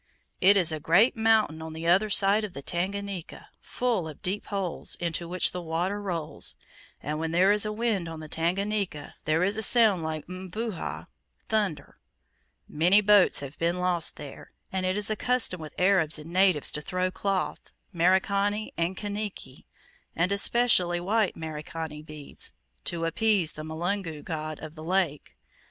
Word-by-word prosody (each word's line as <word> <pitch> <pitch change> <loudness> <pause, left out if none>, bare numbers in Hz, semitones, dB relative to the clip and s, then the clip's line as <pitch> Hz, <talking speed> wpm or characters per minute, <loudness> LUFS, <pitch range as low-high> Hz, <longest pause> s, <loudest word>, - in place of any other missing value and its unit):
"It 200 +2 +6
is 175 -4 +3
a 155 - -3
great 175 - +4
mountain 220 -8 +2
on 160 0 -7
the 160 +1 -6
other 190 +5 +4
side 200 +1 +4
of 205 -4 -5
the 140 - -8
Tanganika, 195 +1 -4
full 235 -9 -1
of 155 - -11
deep 195 +3 -2
holes, 195 -4 -1
into 170 0 -3
which 180 +1 0
the 180 - -5
water 175 +5 -2
rolls; 165 -6 -4 0.5
and 150 +2 -3
when 160 0 -2
there 180 +4 +4
is 210 +1 +3
wind 210 -5 -1
on 165 -1 -7
the 155 - -8
Tanganika, 185 +1 -1
there 160 +2 +2
is 200 +3 +1
a - - 0
sound 220 -4 +4
like 155 -1 -4
mvuha 185 +2 -5 0.4
(thunder). 200 -10 -2 0.7
Many 175 +7 +4
boats 205 -5 +5
have 140 0 -8
been 170 +2 +1
lost 180 -2 +2
there, 145 -2 -10 0.2
and 185 -1 -1
it 185 +2 0
is 210 +1 -1
a - - +1
custom 245 -8 +1
with 155 - -9
Arabs 180 -4 +3
and 155 +3 -10
natives 185 -5 +3
to 150 - -4
throw 185 +3 -1
cloth 195 0 -2 0.2
Merikani 200 +4 +1
and 170 +3 -1
Kaniki 205 -10 -5 0.5
and 175 +3 +1
especially 200 -4 +3
white 205 +3 +1
(Merikani) 155 -1 -6
beads, 155 -2 -5 0.3
to 165 -1 -1
appease 195 -2 +2
the 155 - -7
mulungu 160 0 -3
(god) 155 -2 -5
of 155 -1 -7
the 155 -1 -10
lake. 170 -4 -1
180 Hz, 165 wpm, -27 LUFS, 160-200 Hz, 0.7 s, It